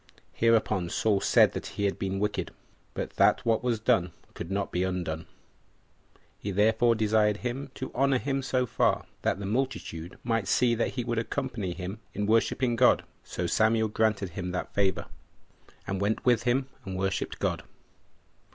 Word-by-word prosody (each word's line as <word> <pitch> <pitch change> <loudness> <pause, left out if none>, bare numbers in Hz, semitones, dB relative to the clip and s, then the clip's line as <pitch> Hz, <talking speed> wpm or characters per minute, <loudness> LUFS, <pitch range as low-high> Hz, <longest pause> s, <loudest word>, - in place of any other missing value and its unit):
Hereupon 110 -6 +2
Saul 100 0 +1
said - - +5
that - - -5
he 100 - -1
had 100 - 0
been 95 0 -2
wicked, 105 +1 -1 0.5
but - - -3
that - - +4
what 115 0 +2
was 120 -3 0
done 90 -5 +2 0.2
could 85 - -7
not 100 +1 -2
be 90 - 0
undone: 90 -4 -2 1.1
he 100 - -4
therefore 110 +4 +3
desired 105 -1 +2
him 130 +4 -4
to 130 - -5
honor 135 +1 +3
him 135 +3 -1
so 130 -1 0
far, 115 - +1 0.2
that - - +1
the 100 - -5
multitude 105 -7 -3
might 115 -4 0
see 120 +3 +3
that 115 +2 -1
he 125 - -1
would 120 -1 -1
accompany 115 -7 -3
him 95 +4 -6 0.2
in 105 - -1
worshipping 115 +3 +2
God. 125 +2 +4 0.2
So 90 - -4
Samuel 110 +4 +2
granted 105 -3 +1
him 90 +1 -5
that 90 - -4
favor, 100 -2 +1 0.8
and 95 0 -3
went 105 +2 0
with 120 -1 +3
him 130 +2 +2 0.2
and 95 -1 -5
worshipped 95 +1 -2
God. - - -1
110 Hz, 170 wpm, -28 LUFS, 95-120 Hz, 1.1 s, said